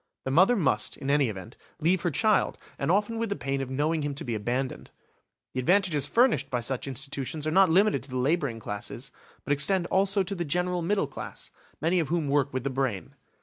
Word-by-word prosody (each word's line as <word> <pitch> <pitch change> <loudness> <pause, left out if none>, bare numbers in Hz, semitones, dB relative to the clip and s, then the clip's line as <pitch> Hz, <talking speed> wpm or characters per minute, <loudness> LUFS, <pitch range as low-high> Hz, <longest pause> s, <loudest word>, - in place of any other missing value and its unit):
The 130 - -1
mother 185 - +5
must, 130 - +1
in 135 - -2
any 140 -4 +3
event, 105 +3 -8 0.2
leave 170 +3 +2
her 175 - +1
child, 215 +6 +2 0.2
and 140 - -1
often 210 +5 +1
with 230 -1 -1
the 200 - -1
pain 135 -4 -2
of 135 - -4
knowing 150 +4 0
him 145 -1 -3
to - - -6
be 120 - -3
abandoned. 120 +5 -3 0.6
The 130 - -2
advantages 170 -1 +2
furnished 230 - +2
by 125 -3 -1
such 125 +3 -3
institutions 135 +3 -3
are 155 - 0
not 190 +2 +5
limited 200 +6 +3
to - - -10
the 130 - -3
labouring 135 -3 0
classes, 105 -1 -6 0.3
but 145 - +1
extend 175 +6 +2
also 195 +1 +3
to 190 +2 -4
the 175 -3 -2
general 180 +3 -1
middle 195 +1 +1
class, 140 - -8 0.3
many 170 +4 +2
of 160 - 0
whom 165 -2 -1
work 140 -1 +2
with 130 -1 -3
the 140 - -2
brain. 130 -7 -2
145 Hz, 215 wpm, -27 LUFS, 135-180 Hz, 0.6 s, mother